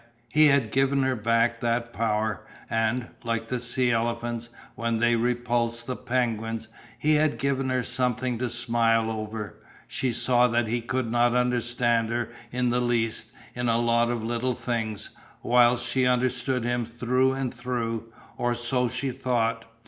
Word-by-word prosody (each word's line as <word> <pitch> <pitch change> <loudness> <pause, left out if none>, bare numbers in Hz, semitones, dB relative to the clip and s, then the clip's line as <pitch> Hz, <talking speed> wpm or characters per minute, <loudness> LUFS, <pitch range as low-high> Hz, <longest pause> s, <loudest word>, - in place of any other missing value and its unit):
He 155 +4 +6
had 140 -6 +3
given 135 +1 +2
her 130 -1 +1
back 115 +1 +1
that 115 0 -1
power 110 -2 -1 0.3
and, 115 +2 0
like 115 -1 -2
the 125 - -1
sea 125 +1 +1
elephants 120 0 -1 0.2
when 115 -1 -1
they 120 +1 +3
repulsed 120 0 0
the 130 - -3
penguins, 115 -3 -2 0.3
he 150 +5 +2
had 150 -4 +2
given 135 +1 0
her 130 -1 0
something 125 -1 -1
to 125 -1 -1
smile 115 -1 +1
over. 110 -1 -5 0.3
She 130 - -1
saw 125 +1 +3
that 120 -1 +1
he 120 +2 -1
could 120 0 -2
not 120 0 +3
understand 120 -2 +1
her 120 0 -1 0.2
in 125 0 0
the 125 +1 +1
least 115 -2 -1 0.2
in 125 -1 -1
a 115 - +3
lot 120 0 +2
of 120 -2 -2
little 120 +2 -1
things, 110 -4 -3 0.3
whilst 120 0 +4
she 125 +1 +1
understood 125 0 +1
him 120 0 0
through 125 +3 +1
and 135 -2 -3
through 115 -2 -3 0.3
or 120 0 0
so 120 +1 0
she 130 +2 -2
thought. 115 -3 -1
120 Hz, 160 wpm, -26 LUFS, 115-125 Hz, 0.3 s, He